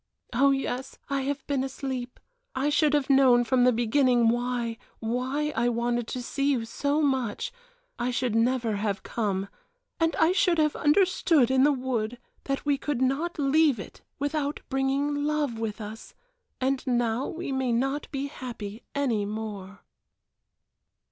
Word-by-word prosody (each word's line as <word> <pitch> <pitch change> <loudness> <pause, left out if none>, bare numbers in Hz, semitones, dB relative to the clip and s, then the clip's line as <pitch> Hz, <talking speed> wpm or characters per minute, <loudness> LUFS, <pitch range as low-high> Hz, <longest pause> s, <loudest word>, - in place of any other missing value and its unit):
"Oh 275 +4 +4
yes, 270 -1 -2
I 275 -1 +1
have 285 -1 -3
been 275 -2 0
asleep 260 -2 -5 0.4
I 270 +3 +1
should 300 0 +3
have 290 -3 +1
known 265 -3 +5
from 250 +1 +3
the 250 - +6
beginning 240 0 +3
why, 240 -1 -1 0.2
why 260 +6 -1
I 235 +2 +2
wanted 240 0 -1
to 250 - -4
see 280 +2 0
you 235 -4 -1
so 285 +6 0
much 265 - 0 0.5
I 245 - 0
should 250 -2 -1
never 230 -1 +1
have 205 -1 -2
come 200 -4 -2 0.5
and 330 -1 +2
I 320 +2 +4
should 365 -2 +3
have 305 -1 +2
understood 310 - +3
in 265 0 +4
the 290 +2 +5
wood 245 -4 -2 0.3
that 275 +1 -2
we 285 -2 +2
could 290 -4 -2
not 275 +7 0
leave 290 -3 +3
it - - -10 0.2
without 290 0 -1
bringing 280 +2 0
Love 295 -6 0
with 225 0 -3
us 215 +1 -9 0.4
and 265 +1 0
now 240 0 +1
we 335 -3 -5
may 265 -2 0
not 270 +5 0
be 275 -1 -3
happy 235 -6 -7
any 250 -7 +1
more." 205 -2 -6
260 Hz, 155 wpm, -27 LUFS, 235-285 Hz, 0.5 s, the